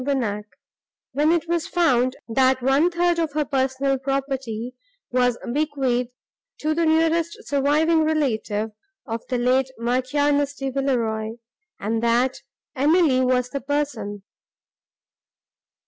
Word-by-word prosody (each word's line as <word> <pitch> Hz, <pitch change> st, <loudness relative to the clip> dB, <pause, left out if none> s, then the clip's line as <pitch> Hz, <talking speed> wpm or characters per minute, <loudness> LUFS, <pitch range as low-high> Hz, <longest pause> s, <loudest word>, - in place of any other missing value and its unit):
Bonnac, 230 Hz, -7 st, -1 dB, 0.7 s
when 295 Hz, +4 st, +2 dB
it 335 Hz, -1 st, +1 dB
was 340 Hz, -1 st, -1 dB
found, 255 Hz, -7 st, +2 dB
that 260 Hz, +2 st, +2 dB
one 275 Hz, +6 st, +4 dB
third 345 Hz, 0 st, +1 dB
of 320 Hz, -3 st, -1 dB
her 300 Hz, 0 st, 0 dB
personal 270 Hz, 0 st, 0 dB
property 265 Hz, -3 st, -3 dB, 0.4 s
was 245 Hz, -1 st, +2 dB, 0.2 s
bequeathed 270 Hz, -5 st, 0 dB, 0.5 s
to 310 Hz, +1 st, 0 dB
the 330 Hz, +1 st, +1 dB
nearest 325 Hz, +1 st, +2 dB
surviving 300 Hz, +3 st, +2 dB
relative 225 Hz, -9 st, 0 dB, 0.3 s
of 230 Hz, -2 st, -4 dB
the 255 Hz, -, 0 dB
late 255 Hz, +2 st, +2 dB
Marchioness 285 Hz, +4 st, +1 dB
de 270 Hz, -1 st, -3 dB
Villeroi, 230 Hz, -5 st, -1 dB, 0.5 s
and 225 Hz, +2 st, -1 dB
that 240 Hz, +2 st, +1 dB, 0.3 s
Emily 290 Hz, -1 st, +3 dB
was 250 Hz, -1 st, +1 dB
the 280 Hz, -, -3 dB
person. 280 Hz, -8 st, -3 dB
270 Hz, 115 wpm, -23 LUFS, 245-300 Hz, 0.7 s, one